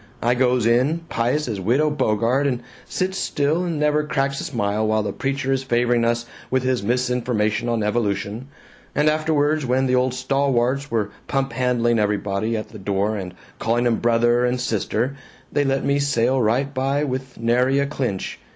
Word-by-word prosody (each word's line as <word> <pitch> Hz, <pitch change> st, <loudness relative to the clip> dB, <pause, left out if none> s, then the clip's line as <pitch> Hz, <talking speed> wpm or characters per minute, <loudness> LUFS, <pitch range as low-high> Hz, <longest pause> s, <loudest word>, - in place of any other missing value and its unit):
I 120 Hz, +1 st, +3 dB
goes 125 Hz, -2 st, +2 dB
in, 130 Hz, +8 st, +2 dB
pious 125 Hz, +6 st, 0 dB
as 110 Hz, -4 st, -3 dB
Widow 135 Hz, +10 st, +2 dB
Bogart, 130 Hz, 0 st, +1 dB
and 125 Hz, -3 st, -2 dB, 0.2 s
sits 190 Hz, +1 st, -2 dB
still 150 Hz, +5 st, 0 dB
and 165 Hz, -4 st, -2 dB
never 150 Hz, 0 st, +2 dB
cracks 140 Hz, -2 st, -1 dB
a -, -, -5 dB
smile 110 Hz, -3 st, -1 dB
while 110 Hz, 0 st, +1 dB
the 105 Hz, -, -3 dB
preacher 135 Hz, 0 st, -2 dB
is 135 Hz, -1 st, +1 dB
favoring 120 Hz, -2 st, +1 dB
us 120 Hz, 0 st, 0 dB, 0.2 s
with 130 Hz, 0 st, +1 dB
his 130 Hz, -3 st, +1 dB
misinformation 120 Hz, -1 st, 0 dB
on 115 Hz, -2 st, 0 dB
evolution. 105 Hz, +2 st, -1 dB, 0.5 s
But 150 Hz, +2 st, +3 dB
afterwards, 155 Hz, -1 st, +1 dB
when 130 Hz, +1 st, +1 dB
the 130 Hz, -, +1 dB
old 125 Hz, 0 st, +2 dB
stalwarts 135 Hz, 0 st, 0 dB
were 105 Hz, -3 st, -1 dB, 0.2 s
pumphandling 125 Hz, -3 st, +1 dB
everybody 105 Hz, +1 st, 0 dB
at 110 Hz, -, -6 dB
the 110 Hz, -, -11 dB
door 100 Hz, +2 st, 0 dB
and 90 Hz, -3 st, -6 dB, 0.2 s
calling 120 Hz, +2 st, +1 dB
'em 115 Hz, -2 st, +2 dB
'Brother' 120 Hz, +1 st, +3 dB
and 125 Hz, +1 st, +1 dB
'Sister,' 115 Hz, +3 st, -1 dB, 0.4 s
they 145 Hz, -, +2 dB
let 135 Hz, -1 st, 0 dB
me 140 Hz, 0 st, +2 dB
sail 130 Hz, -2 st, +2 dB
right 130 Hz, +6 st, +1 dB
by 135 Hz, +2 st, 0 dB
with 130 Hz, -2 st, -4 dB
nary 125 Hz, +4 st, +2 dB
a 140 Hz, -, +2 dB
clinch. 130 Hz, -9 st, -3 dB
125 Hz, 175 wpm, -22 LUFS, 115-135 Hz, 0.5 s, I